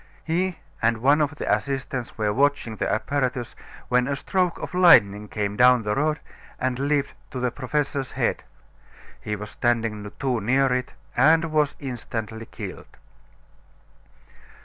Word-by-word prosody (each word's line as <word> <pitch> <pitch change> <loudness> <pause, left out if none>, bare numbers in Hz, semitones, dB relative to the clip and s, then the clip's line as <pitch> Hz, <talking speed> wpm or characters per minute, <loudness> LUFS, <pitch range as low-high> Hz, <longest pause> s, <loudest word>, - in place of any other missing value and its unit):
He 175 +2 -1 0.2
and 115 0 +2
one 140 +6 +4
of 145 -1 0
the - - +1
assistants 135 -3 -4
were 105 -1 0
watching 140 -3 +1
the - - -1
apparatus 125 +1 -1 0.3
when 125 0 +2
a 140 - 0
stroke 180 +4 0
of - - -7
lightning 105 - +6
came 100 -1 -2
down 125 0 +5
the 105 0 0
rod 150 +3 0 0.4
and 130 0 -1
leaped 145 0 0 0.2
to 130 - -5
the 125 -1 0
professor's 140 +1 -2
head. - - 0 0.8
He 105 - -3
was 105 +1 -8
standing 110 -4 -1
too 130 -4 -1
near 130 +4 +2
it 125 0 -2 0.2
and 160 +5 +4
was 150 -2 +2
instantly 115 -4 -5
killed. - - -9
130 Hz, 145 wpm, -24 LUFS, 115-145 Hz, 0.8 s, lightning